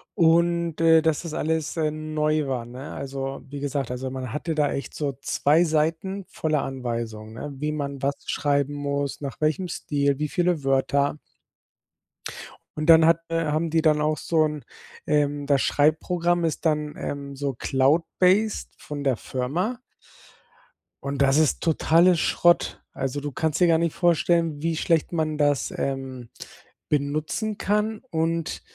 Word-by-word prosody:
Und, 170 -1 +2
äh, 165 -1 +6
dass 160 0 0
das 165 -2 -6
alles, 160 0 -1
äh, 155 -1 +1
neu 155 -1 -1
war, 125 -3 -2
ne? 125 +4 -9
Also, 135 0 -5
wie 140 0 -6
gesagt, 140 -3 -2
also, 130 +1 -4
man 130 -3 -5
hatte 160 +2 -2
da 150 -1 +2
echt 140 - -5
so 145 -3 -2
zwei 150 +5 +3
Seiten 165 +5 0
voller 155 -3 -1
Anweisung, 115 -4 -5
ne, 145 +5 -6
wie 150 +3 -2
man 140 -2 -4
was 140 0 +1
schreiben 145 0 0
muss, 140 0 -2
nach 140 +2 -6
welchem 155 +4 +1
Stil, 140 -2 -1
wie 150 -1 -1
viele 175 -5 0
Wörter. 140 +2 +1 1.6
Und 155 +1 -2
dann 160 -1 +8
hat, 165 0 +4
äh 165 0 0
haben 155 +2 0
die 160 0 +2
dann 155 -2 +3
auch 155 0 +1
so 160 -2 +1
'n, 150 -3 -4 0.4
ähm 145 -1 +1
das 140 -2 +3
Schreibprogramm 170 +3 +1
ist 160 +1 -3
dann, 150 -1 0
ähm, 140 -1 -5
so 140 0 -2
Cloud 135 +6 +2 0.2
based 200 +4 +2
von 145 -1 -6
der 135 -5 +1
Firma. 170 - -2 1.2
Und 140 0 -2
das 135 +1 +4
ist 155 -2 +2
totale 170 +2 +4
Schrott. 175 +2 +2
Also, 135 +2 -3
du 145 0 -4
kannst 160 +4 -1
dir 175 - +6
gar 165 -1 +4
nicht 170 -1 -1
vorstellen, 170 -3 +2
wie 165 0 0
schlecht 165 +1 +1
man 155 -2 -1
das, 145 -4 +1
ähm, 130 -3 -4 0.6
benutzen 155 +9 -1
kann 210 +1 0
und, 165 0 -1
150 Hz, 160 wpm, -24 LUFS, 140-165 Hz, 1.6 s, dann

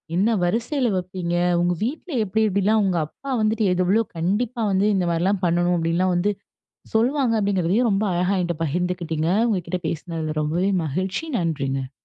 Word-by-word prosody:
என்ன 215 +5 +2
வரிசைல 240 - 0
வப்பீங்க? 180 -1 -3 0.3
உங்க 175 0 +2
வீட்ல 310 +8 -4
எப்டி 220 +2 0
எப்படிலாம் 205 +2 +2
உங்க 180 -3 +1
அப்பா 275 - -8
வந்துட்டு 215 0 +1
எது 185 - +1
எவ்ளோ 215 +5 +3
கண்டிப்பா 220 +8 -1
வந்து 195 +2 +2
இந்த 185 -2 +1
மாரிலாம் 185 +4 0
பண்ணனும், 175 +1 +2
அப்டின்னுலாம் 170 +3 +1
வந்து 185 +4 +1 0.6
சொல்வாங்க? 245 +1 +2
அப்டிங்கறதையும் 200 +3 +1
ரொம்ப 200 +1 +1
அழகா 180 +3 +1
என்கிட்ட 175 -1 -2
பகிர்ந்துகிட்டீங்க. 165 0 -1 0.2
உங்ககிட்ட 180 -3 -2
பேசுனதுல 160 -1 -4
ரொம்பவே 175 +6 0
மகிழ்ச்சி. 185 - -2
நன்றிங்க. 135 -6 -2
185 Hz, 150 wpm, -23 LUFS, 170-215 Hz, 0.6 s, எவ்ளோ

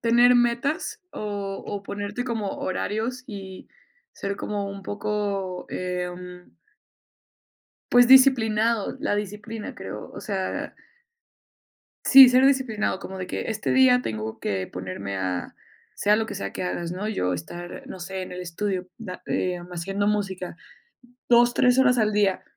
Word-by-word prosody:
tener 240 +1 +5
metas 240 +5 +1
o 200 -2 -4
o 205 -1 -4
ponerte 205 +4 -4
como 225 -5 -2
horarios 220 +7 -2
y 195 -5 -8 0.5
ser 200 0 -4
como 205 -1 -3
un 200 0 -8
poco, 200 -2 -3
em 180 0 -5 1.4
pues, 245 0 +7
disciplinado. 230 -5 +5
La - - +1
disciplina 210 +2 -5
creo, - - -7
o - - -8
sea 195 -3 -3 1.3
sí, 270 -2 +10
ser 255 +1 +5
disciplinado, 260 -8 +1
como 190 0 -7
de 185 -1 -5
que - - -3
este 215 -1 -2
día 255 -1 +5
tengo 110 - -4
que 95 -2 -2
ponerme 95 +2 -5
a, 90 -1 -3 0.4
sea 210 +1 +3
lo 220 +1 0
que - - -6
sea 100 - -4
que - - -4
hagas, 175 -1 -3
¿no? 190 +4 -3
Yo 90 - -1
estar, 175 - -7
no 190 - -8
sé, 190 +2 -5
en 185 - -9
el 180 - -6
estudio, 180 +1 -3
da, 190 -6 -8
em, 180 -1 -2
haciendo 195 +4 -2
música 195 -3 -2 0.7
2, 240 0 +6
3 250 0 +3
horas 250 -2 +5
al 215 -2 +2
día. 205 -2 +2
205 Hz, 145 wpm, -25 LUFS, 180-230 Hz, 1.4 s, sí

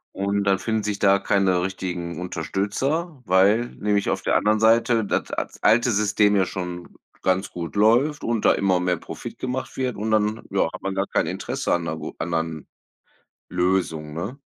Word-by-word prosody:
und 100 +1 0
dann 100 -1 +2
finden 110 +2 -1
sich 105 -1 -2
da 100 0 +4
keine 95 -3 +2
richtigen 90 -2 -4
Unterstützer, 125 - -2
weil 100 +5 +4
nämlich 105 -1 0
auf - - -1
der - - 0
anderen 105 +1 +3
Seite 115 0 +3
das - - -1
at - - -4
alte 120 +3 +4
System 105 0 +3
ja 95 -2 +3
schon 90 -1 -6 0.3
ganz 95 +1 +1
gut 85 +1 -6
läuft 120 +8 +3
und 115 -2 -1
da - - +6
immer 95 -2 +2
mehr 90 -1 +1
Profit - - -8
gemacht 130 0 -4
wird, 130 -2 -1
und 110 +2 -3
dann, 110 0 +1
ja, 100 - +2
hat - - -8
man 95 0 -3
gar 95 +1 0
kein - - 0
Interesse - - -2
an 85 - 0
'ner 80 -1 -3
gu 75 - -6
anderen 80 -3 -3 0.8
Lösung, 90 -4 -1
ne? 100 - -5
100 Hz, 180 wpm, -23 LUFS, 90-110 Hz, 0.8 s, da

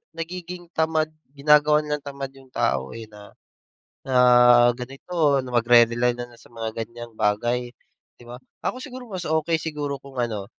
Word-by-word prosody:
nagiging 175 +1 -7
tamad 160 -1 +1 0.3
ginagawa 150 +1 +4
nilang 150 -1 -3
tamad 140 -1 -6
yung 135 -1 -18
tao, 65 0 0
eh, 115 -1 -7
na 105 -1 -14 0.7
na 130 -1 0 0.6
ganito, 140 +4 -1
na 125 - -8
magre-rely 120 0 +4
nalang 120 0 -8
sa - - -19
mga 115 -1 -5
ganyang 120 +1 -11
bagay, 120 +4 0 0.5
'di - - -16
ba? 120 +1 -8 0.3
Ako 255 - -2
siguro 255 -2 -9
mas 185 -3 -5
okey 160 +1 +1
siguro 150 -3 -4
kung 140 -1 -13
ano, 110 -5 -2
135 Hz, 155 wpm, -24 LUFS, 120-160 Hz, 0.7 s, ginagawa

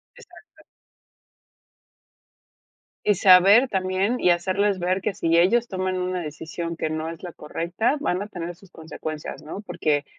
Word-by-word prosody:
Exacto. 475 -2 -18 2.4
Y 210 - +4
saber 195 +7 +6
también 190 +4 0
y - - +3
hacerles 190 +3 +1
ver 185 +2 0
que 210 - -1
si 165 -1 +1
ellos 230 +7 +3
toman 185 -2 -2
una 180 0 -2
decisión 165 +2 -6
que 160 - -3
no 155 +1 -3
es 165 -1 -9
la 175 - -6
correcta, 175 - -2
van 185 -10 -1
a 205 - -5
tener 175 -3 -6
sus 190 +1 -20
consecuencias, 155 -1 -7
¿no?, 160 +6 -7
porque, 150 -8 -1
180 Hz, 145 wpm, -24 LUFS, 165-200 Hz, 2.4 s, saber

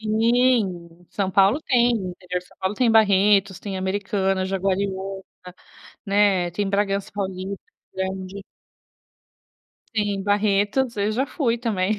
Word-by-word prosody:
Sim, 215 -6 +1
São 195 -2 -2
Paulo 195 +8 +4
tem, 245 -2 +3
interior 180 -4 -4
de - - -19
São - - -23
Paulo 190 +2 -2
tem 240 +2 +2
Barretos, 200 -3 +4
tem 200 -2 -5
Americana, 190 0 -1
Jaguariuna, 195 0 -2 0.8
né, 200 -3 +2
tem 200 +3 -2
Bragança 200 0 0
Paulista, 190 -1 -4 0.3
grande 190 +1 -4 1.5
Sim, 205 -2 -1
Barretos, 205 +5 +1
eu 205 +1 0
já 260 +5 0
fui 255 -5 0
também. 210 -5 0
200 Hz, 120 wpm, -23 LUFS, 190-215 Hz, 1.5 s, Paulo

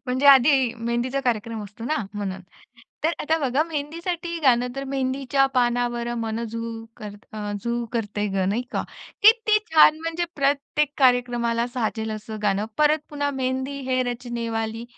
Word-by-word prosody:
म्हणजे 255 +3 +1
आधी 265 -2 +6
मेहंदीचा 240 +3 -1
कार्यक्रम 230 -3 -2
असतो 210 +3 -10
ना 310 +4 0 0.2
म्हणून. 195 -2 -4 0.6
तर 330 - +3
आता 320 +2 +1
बघा 275 0 +1
मेहंदीसाठी 335 +2 -4
गाणं 250 -3 +4
तर, 275 - -3
मेहंदीच्या 270 0 +1
पानावर 240 -1 +1
मन 225 0 -2
झू 230 0 -5 0.3
करत 205 +1 -10
अं, 210 -1 -4
झू 235 0 -1
करतय 210 -3 -2
गं, 190 -1 +1
नाही-का? 240 +5 -2 0.4
किती 435 0 +6
छान 310 -1 +7
म्हणजे 330 +1 -2
प्रत्येक 285 +1 +1
कार्यक्रमाला 240 -3 +2
साजेल 220 -2 -2
असं 215 0 -6
गाणं 205 0 +1
परत 300 +1 +4
पुन्हा 285 -1 -1
मेहंदी 260 +2 -2
है 255 0 +2
रचनेवाली. 230 -2 -4
245 Hz, 145 wpm, -24 LUFS, 230-280 Hz, 0.6 s, छान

